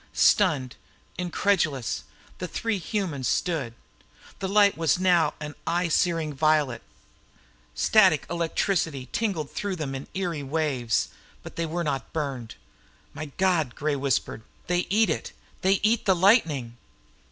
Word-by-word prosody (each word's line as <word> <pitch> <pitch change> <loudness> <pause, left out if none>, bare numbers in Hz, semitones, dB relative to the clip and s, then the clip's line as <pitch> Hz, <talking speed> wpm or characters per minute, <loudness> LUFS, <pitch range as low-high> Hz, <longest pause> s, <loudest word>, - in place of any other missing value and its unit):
Stunned, 130 -4 +3 0.4
incredulous, 175 - 0 0.3
the 180 - -3
three 225 +2 -2
humans 170 - -2
stood. 150 - -1 0.6
The 190 - -2
light 205 0 +5
was 165 -2 +2
now 175 -4 +3
an 150 -1 -6
eye 175 0 +1
searing 165 -2 +1
violet. 150 -3 +2 0.9
Static 185 - +4
electricity 165 - -1
tingled 185 -11 -2
through 200 -2 -3
them 150 -5 -4
in 135 0 -6
eerie 175 -5 -2
waves. 135 -5 0 0.3
But - - -10
they 165 -1 -2
were 170 +2 -2
not 140 -4 -3
burned. 135 -7 -4 0.6
"My 155 - -5
God," 175 -9 +1
whispered 140 -6 -1 0.2
Gray. 180 0 +1
"They - - -7
eat 215 +3 +3
it. - - -4 0.3
They 190 +1 +4
eat 215 0 +2
lightning!" 170 - +3
160 Hz, 130 wpm, -26 LUFS, 140-185 Hz, 0.9 s, light